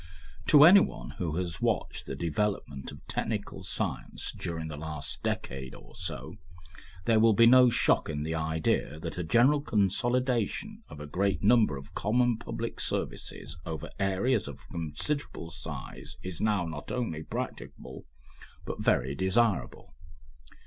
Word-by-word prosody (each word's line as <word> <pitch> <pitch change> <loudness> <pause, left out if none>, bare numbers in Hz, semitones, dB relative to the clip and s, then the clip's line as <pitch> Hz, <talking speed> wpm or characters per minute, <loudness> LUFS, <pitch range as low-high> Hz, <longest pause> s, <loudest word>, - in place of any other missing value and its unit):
To 145 -1 +8
anyone 165 - +6
who 85 -4 -1
has 85 -2 -3
watched - - -1
the 70 - -4
development 80 -3 -2
of 70 - -13
technical - - -3
science - - -3
during 80 -2 -4
the 80 - -6
last 75 -1 -5
decade 65 0 -3
or - - -15
so, 80 0 -5 0.7
there 115 -2 +4
will 110 -1 +5
be 115 - +7
no 125 +1 +8
shock 115 - +2
in 75 -1 -2
the 80 +1 -2
idea 80 -1 0
that 85 +2 -5
a - - -1
general 125 - +4
consolidation 125 - 0
of - - -10
a 75 - -6
great 95 +7 0
number 110 - +4
of 70 - -11
common 120 +2 +2
public 115 0 -5
services - - -3
over 80 -3 -5
areas 100 - +1
of 70 -2 -10
considerable 85 - -3
size - - -8
is 90 -3 -5
now 105 -5 +2
not 80 -3 -6
only 115 -11 -2
practicable, - - -6 0.6
but - - -5
very 65 +2 +2
desirable. 95 +5 0
90 Hz, 140 wpm, -29 LUFS, 80-115 Hz, 0.7 s, To